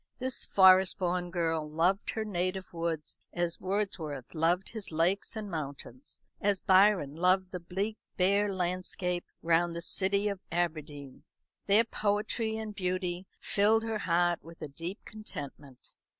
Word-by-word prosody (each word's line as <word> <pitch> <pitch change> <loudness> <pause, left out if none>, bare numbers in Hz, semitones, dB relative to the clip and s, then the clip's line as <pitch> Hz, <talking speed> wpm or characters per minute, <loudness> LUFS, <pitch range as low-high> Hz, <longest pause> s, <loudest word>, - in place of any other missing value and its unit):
This 260 0 -2
Forest 190 -1 +6
born 180 -1 -1
girl 165 -3 -1
loved 175 +6 +1
her 220 -1 -2
native 185 -1 -2
woods 165 -2 -3
as 175 -1 -1
Wordsworth 185 - -2
loved 170 +3 +1
his 220 -5 -5
lakes 170 +8 +1
and 215 -1 -4
mountains, 160 - -6 0.2
as 200 -2 +2
Byron 190 -7 +4
loved 185 +2 +2
the 180 - -4
bleak 195 +5 -3 0.2
bare 200 +2 +3
landscape 180 -1 -2 0.2
round 170 +1 +2
the 170 - -3
city 200 +3 +1
of 200 -2 -2
Aberdeen. 155 -5 -3 0.4
Their 205 +3 +6
poetry 220 +1 -1
and 220 -1 -5
beauty 185 -1 -2
filled 215 +2 +3
her 225 -1 -2
heart 175 -1 +2
with 165 0 -11
a - - -3
deep 165 +8 -6
contentment. 145 - -9
185 Hz, 140 wpm, -30 LUFS, 170-200 Hz, 0.4 s, Forest